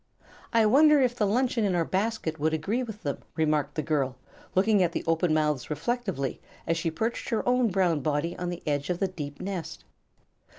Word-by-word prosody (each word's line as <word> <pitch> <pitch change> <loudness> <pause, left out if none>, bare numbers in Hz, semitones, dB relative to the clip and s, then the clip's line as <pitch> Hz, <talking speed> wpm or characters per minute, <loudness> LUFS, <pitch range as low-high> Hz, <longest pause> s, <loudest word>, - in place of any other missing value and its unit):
"I 225 -1 +4
wonder 295 +6 +6
if 250 -2 +2
the 210 -4 +1
luncheon 240 +2 +1
in 195 -3 +1
our 170 -1 +1
basket 190 -5 -1
would 155 +2 +1
agree 200 +11 -1
with 220 -4 -7
them," 140 -2 -2 0.2
remarked 150 -2 +1
the 155 - -1
girl, 140 -4 0 0.4
looking 200 +2 +4
at 170 -2 +2
the - - -2
open 165 +1 +1
mouths 150 -4 +1
reflectively 165 - -2 0.2
as 165 - +1
she 165 0 -1
perched 225 +9 -3
her 225 - -1
own 250 -1 +3
brown 180 -5 +2
body 150 +4 -1
upon 180 0 -4
the 175 -1 -6
edge 145 0 -1
of 180 - 0
the 195 - 0
deep 145 -5 -7
nest. 185 -3 -5
175 Hz, 200 wpm, -27 LUFS, 155-220 Hz, 0.4 s, wonder